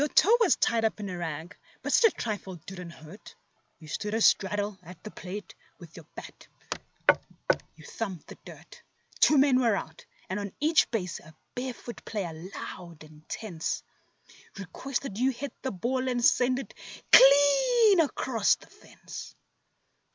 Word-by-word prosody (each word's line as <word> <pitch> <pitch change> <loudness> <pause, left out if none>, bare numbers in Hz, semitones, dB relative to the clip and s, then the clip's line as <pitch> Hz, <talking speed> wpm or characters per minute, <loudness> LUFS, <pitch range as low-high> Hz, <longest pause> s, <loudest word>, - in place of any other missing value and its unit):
TOE 425 +8 +6
was 450 -7 +4
tied 230 -1 +1
up 220 -1 0
in 200 -2 -5
a 180 - -5
rag, 160 0 -5 0.3
but - - -1
such 455 -3 +6
a - - -22
trifle 205 -4 -4
didn't 180 -2 -8
hurt; 170 +4 -13 0.4
You 155 - -14
stood 210 +7 -3
a 225 - 0
straddle 205 -1 +2
at 180 0 -13
the 215 - -8
plate, 195 +3 -8
and - - -34
with 170 -3 -13
your 165 -3 -12
bat - - -11 1.3
you - - -15
thumped 195 -8 -5
the - - -12
dirt; - - -13 0.4
Two 300 - +6
men 270 -2 +5
were 230 -4 +3
out, 160 -4 -6 0.2
and 190 +2 -3
on 200 -2 -5
each 315 +2 +3
base 185 -7 -3
a 155 0 -16 0.2
barefoot 245 -1 -6
player 190 -6 -4
loud 170 -1 -9
and 155 0 -17
tense 175 -8 -4 0.7
Requested 235 +3 -5
you 260 +2 +3
to - - -15
hit 285 +2 -5
the 265 - -2
ball 255 +7 -2
and 245 -1 +1
send 255 0 +4
it 270 - -7 0.4
clean 355 - +7
across 255 -8 +2
the - - -18
fence. - - -11
210 Hz, 165 wpm, -28 LUFS, 180-260 Hz, 1.3 s, clean